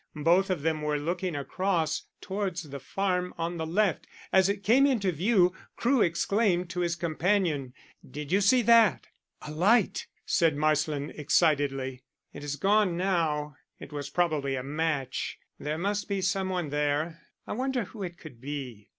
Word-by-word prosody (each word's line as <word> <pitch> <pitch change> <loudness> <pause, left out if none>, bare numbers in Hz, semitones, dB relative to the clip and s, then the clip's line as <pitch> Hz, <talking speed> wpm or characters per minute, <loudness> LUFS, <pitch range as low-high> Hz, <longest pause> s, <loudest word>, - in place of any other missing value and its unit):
Both 180 +4 +4
of 175 -6 -1
them 160 -1 0
were 150 0 0
looking 170 +3 -2
across 160 +2 -1
towards 190 -3 -3
the 140 -2 -8
farm 180 +5 -2
on 170 +1 -3
the 160 -1 -3
left. 190 +1 +1 0.3
As 190 0 +5
it 200 0 -2
came 260 +7 +5
into 215 -9 +1
view 180 +2 +3 0.2
Crewe 250 0 +2
exclaimed 180 0 +1
to 180 - -4
his 170 -1 0
companion: 165 -5 0 0.3
"Did 150 +1 -7
you 195 +2 +3
see 240 +5 +4
that?" 230 -1 +4 0.3
"A 150 - -7
light!" 200 +7 +2 0.2
said 165 -3 +2
Marsland 150 -1 0
excitedly. 140 -4 +1 0.3
"It 145 - -9
is 145 -1 -3
gone 195 +2 +2
now; 155 -6 0 0.2
it 145 - -10
was 145 -1 -4
probably 150 -4 0
a 130 - -3
match. 145 -2 -2 0.2
There 150 +1 -3
must 205 +5 -2
be 200 -1 0
some 190 0 0
one 180 -5 -2
there. 150 +3 -1 0.2
I - - -4
wonder 255 +1 -1
who 210 +2 -10
it 175 -2 -5
could 125 -9 -13
be?" 130 -7 -6
170 Hz, 165 wpm, -28 LUFS, 150-195 Hz, 0.3 s, As